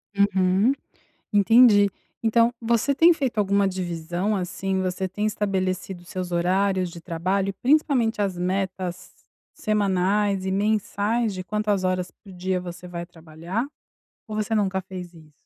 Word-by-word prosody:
Uhum, 200 +3 +3 0.6
entendi. 205 0 +6 0.3
Então, 230 +1 +3
você 235 +4 +1
tem 335 +5 +6
feito 265 -8 -2
alguma 200 -1 +3
divisão, 175 +2 -2
assim, 190 +1 -2
você 185 +1 -1
tem 205 +3 -2
estabelecido 190 -3 -2
os 175 - -18
seus 180 -1 -5
horários 185 +1 +1
de 170 - -10
trabalho 185 +4 -1
e - - -5
principalmente 250 -3 +2
as 195 -3 -1
metas 185 0 -3 0.4
semanais 200 -1 +1
e - - 0
mensais 210 +2 0
de 185 - -5
quantas 210 -1 -1
horas 185 -1 -1
por 200 - -16
dia 185 0 -2
você 180 0 -8
vai 170 -1 -5
trabalhar? 170 - -5 0.6
Ou 215 - -6
você 215 +1 -1
nunca 190 -3 +1
fez 180 -2 -8
isso? 155 -2 -16
190 Hz, 145 wpm, -24 LUFS, 180-210 Hz, 0.6 s, entendi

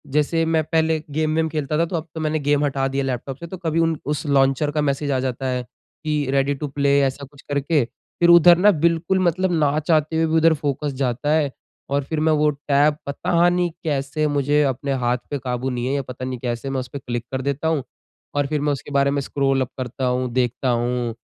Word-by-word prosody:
जैसे 165 +2 +2
मैं 160 -1 +1
पहले 160 0 +1
गेम-वेम 155 +1 0
खेलता 150 -1 -2
था 165 - +2
तो 175 - -5
अब 165 0 -3
तो 160 - -4
मैंने 155 0 0
गेम 145 0 +1
हटा 135 -1 0
दिया 140 - 0
लैपटॉप 130 +1 -4
से 170 - -8
तो 185 - -7
कभी 165 -2 -1
उन 165 -1 +2
उस 150 +2 -2
लॉन्चर 140 +1 +2
का 150 0 0
मैसेज 140 0 -1
आ 130 - +1
जाता 130 0 -3
है 125 -1 -1 0.4
कि 150 -2 0
रेडी 140 +1 +2
टू 150 +1 -4
प्ले 140 0 +2
ऐसा 135 +1 -1
कुछ 140 +1 -18
करके। 145 +1 +1 0.4
फिर 170 0 +4
उधर 170 0 +8
न 205 +4 +6
बिल्कुल 170 +3 +2
मतलब 185 +1 +1
ना 150 -1 +2
चाहते 155 0 +1
हुए 165 0 +2
भी 160 0 0
उधर 165 0 +5
फ़ोकस 145 -1 -2
जाता 130 +4 -1
है 150 -3 +1 0.4
और 140 0 0
फिर 160 +1 -2
मैं 155 +1 +2
वो 150 0 +3
टैप 145 +1 +1
पता 170 +4 +1
नहीं 175 0 +1
कैसे 145 0 -1
मुझे 145 0 +2
अपने 135 0 -1
हाथ 125 +1 +2
पे 145 - -2
काबू 125 0 -3
नहीं 125 -1 -3
है 135 - 0
या 140 - 0
पता 130 -1 -7
नहीं 130 -1 -4
कैसे 120 +2 -3
मैं 135 -1 -1
उसपे 130 +2 -6
क्लिक 120 -2 -4
कर 130 - -2
देता 140 +3 -2
हूँ। 155 -4 0 0.5
और 145 -1 +1
फिर 150 0 -1
मैं 150 - +1
उसके 140 - -7
बारे 140 0 +2
में 145 - 0
स्क्रॉल 135 -1 0
अप 125 - -1
करता 130 0 -4
हूँ, 125 0 0
देखता 125 +1 0
हूँ 120 -1 -1
145 Hz, 230 wpm, -22 LUFS, 135-155 Hz, 0.5 s, उधर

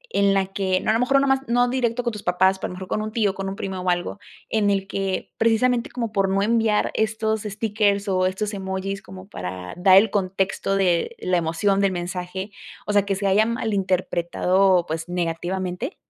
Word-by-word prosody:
en 200 0 +3
la 195 -1 +2
que 190 -2 0
no, - - 0
a - - +3
lo 225 - +1
mejor, 250 +3 +1
no 275 - +2
nada 270 0 +2
más, 270 - -20
no 245 +1 +3
directo 245 -1 0
con 240 - -1
tus 210 - -7
papás, 190 +2 +2
pero - - -3
a - - -7
mejor 185 0 -8
con 215 - -1
un 215 0 -4
tío, 215 -3 +1
con 195 0 -4
un 195 - -5
primo 190 -1 -5
o 180 - -1
algo, 175 +3 -1 0.3
en 210 -2 +2
el 195 -1 +1
que 195 -1 -3
precisamente, 230 +2 +2
como 230 -3 -4
por 195 -2 +1
no 195 +1 +1
enviar 225 -1 +2
estos 220 0 0
stickers 205 -1 0
o 185 -1 +2
estos 205 +3 -3
emojis 195 0 -4
como 190 -1 -12
para 90 - -6
dar 185 +1 +6
el 205 +1 +5
contexto 195 0 -1
de 190 - +1
la 180 -1 +1
emoción 170 +4 +1
del 200 -1 +2
mensaje, 180 +2 -5 0.3
o 210 - -2
sea, 205 -1 +3
que 195 - 0
se 200 +1 -4
hayan 215 +4 +3
malinterpretado, 185 -3 +1
pues, 160 +1 -4
negativamente? 180 - -3
195 Hz, 215 wpm, -23 LUFS, 185-215 Hz, 0.3 s, dar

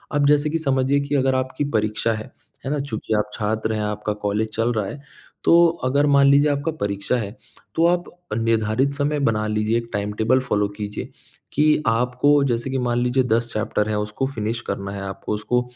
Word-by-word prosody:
अब 145 -1 +3
जैसे 150 +1 +3
कि 165 - 0
समझिए 135 -1 +1
कि 140 +1 -2
अगर 130 -1 +2
आपकी 130 +2 -1
परीक्षा 110 +1 0
है। 110 0 -5 0.4
है 135 - -2
ना? 150 - 0
चूँकि 115 -5 -3
आप 105 0 -1
छात्र 110 +1 -1
हैं, 110 - -1
आपका 105 0 -2
कॉलेज 105 +2 0
चल 115 +2 +1
रहा 105 -3 -1
है, 145 - -6 0.4
तो 170 0 +6 0.2
अगर 140 +3 +3
मान 140 -1 +5
लीजिए 145 +2 +5
आपका 145 +3 -1
परीक्षा 100 +3 -1
है, 110 +1 -5 0.4
तो 165 - +3
आप 175 0 +2 0.3
निर्धारित 115 +4 +1
समय 145 +1 0
बना 110 -1 -1
लीजिए, 105 +1 +1
एक 115 0 -4
टाइम-टेबल 105 +5 +1
फॉलो 105 -5 0
कीजिए 105 -1 -5 0.4
कि 150 +1 +3
आपको 125 +5 +3
जैसे 120 0 -1
कि 135 - -1
मान 120 -1 0
लीजिए 125 +1 +2
10 120 -1 0
चैप्टर 110 0 -1
हैं 105 - 0
उसको 105 +5 -2
फ़िनिश 115 -2 -3
करना 100 0 -4
है, 100 0 -5
आपको 95 +2 -5
उसको 125 +4 0
120 Hz, 200 wpm, -22 LUFS, 105-140 Hz, 0.4 s, तो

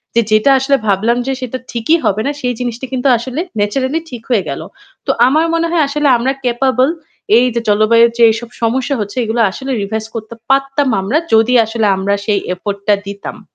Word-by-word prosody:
যে 235 - +5
যেটা 215 +6 +4
আসলে 275 +1 +2
ভাবলাম 215 +5 +2
যে 270 - 0
সেটা 255 0 -4
ঠিকই 240 +8 +1
হবে 210 +2 +1
না - - +1
সেই 250 -1 -1
জিনিসটি 245 +1 -4
কিন্তু 255 +1 0
আসলে 255 +5 -5 0.2
naturally 260 +9 0
ঠিক 245 -3 -8
হয়ে 220 -7 +2
গেল। 140 - -4 0.4
তো - - +2 0.2
আমার 310 +5 +2
মনে 335 0 +1
হয় 330 -3 +3
আসলে 295 +1 0
আমরা 255 +3 0
capable 255 +3 +2 0.5
এইযে 240 -1 +2
জলবায়ুর 230 +3 +4
যে 235 - +4
এইসব 230 +1 -3
সমস্যা 255 +4 0
হচ্ছে 205 +3 -5
এগুলো 225 +1 -1
আসলে 265 +6 -6
revise 220 +2 -4
করতে 225 +1 -6
পারতাম 275 +1 +1
আমরা 215 +11 0 0.2
যদি 225 +3 +4
আসলে 225 0 -1
আমরা 195 +1 -1
সেই 205 -3 +1
effort 200 +2 -5
টা 205 - +6
দিতাম। 200 +1 -7
235 Hz, 190 wpm, -15 LUFS, 215-265 Hz, 0.5 s, টা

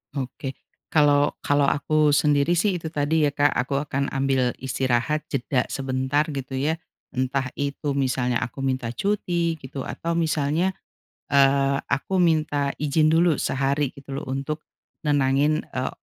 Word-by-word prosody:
Oke. 135 0 -5 0.3
kalau 145 -2 +4
kalau 145 0 +2
aku 150 +1 +2
sendiri 145 +1 +3
sih 185 +3 +2
itu 160 -2 -5
tadi 150 +1 +1
ya 145 - +3
Kak, 145 +1 +3
aku 135 +2 0
akan 140 -1 -2
ambil 135 -2 +1
istirahat 130 +3 0
jeda 125 -1 0
sebentar 135 +2 0
gitu 140 -3 -5
ya, 155 +3 +1 0.4
entah 130 +1 0
itu 140 0 -2
misalnya 125 -3 0
aku 130 - -7
minta 130 -3 -1
cuti 175 0 0
gitu, 135 -3 -7
atau 170 - -4
misalnya, 160 +3 0 0.6
eee, 140 0 +4
aku 180 +7 0
minta 155 -4 +2
izin 155 +1 +2
dulu 165 -1 +3
sehari 140 +1 0
gitu 140 +1 -11
loh - - -8
untuk 140 +3 -3 0.4
nenangin, 145 +1 +2
eee 130 0 -3
140 Hz, 140 wpm, -24 LUFS, 135-155 Hz, 0.6 s, kalau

